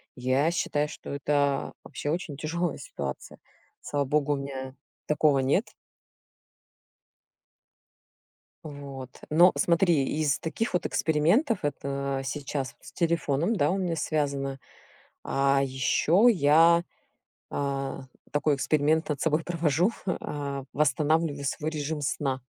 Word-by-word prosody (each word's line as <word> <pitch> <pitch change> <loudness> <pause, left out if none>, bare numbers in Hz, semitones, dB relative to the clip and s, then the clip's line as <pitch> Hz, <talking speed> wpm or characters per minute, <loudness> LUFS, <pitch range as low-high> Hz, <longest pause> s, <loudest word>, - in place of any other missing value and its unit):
Я 130 +5 +1
считаю, 150 -3 0
что - - -9
это 140 0 0
вообще 145 0 -4
очень 160 -4 -3
тяжёлая 170 +4 -2
ситуация. - - -7 0.4
Слава 145 -1 -1
богу, 145 +1 +1
у - - -1
меня 135 -1 -6 0.3
такого 150 -2 +3
нет. 140 - +1 2.9
Вот, 140 -4 -8 0.2
но 175 +4 +6
смотри, 170 -4 +3 0.2
из 150 -2 +1
таких 200 +8 -2
вот 180 - 0
экспериментов, 180 - +2
это 140 -1 -2
сейчас 140 -1 -3
вот - - -21
с - - -12
телефоном, 170 +2 +1
да, 145 -2 +2
у 190 - 0
меня 175 -4 -1
связано, 140 -3 -1 0.7
а 135 0 +2
ещё 150 - +3
я, 170 -3 +5 0.6
а, 135 -1 -3 0.3
такой 145 0 +2
эксперимент 155 +3 +1
над 150 -3 -2
собой 160 0 +1
провожу, 170 +3 +1
а, 140 -6 -3
восстанавливаю 150 +1 +1
свой 150 +3 -2
режим 150 0 -3
сна. 135 -2 -2
150 Hz, 115 wpm, -27 LUFS, 140-165 Hz, 2.9 s, но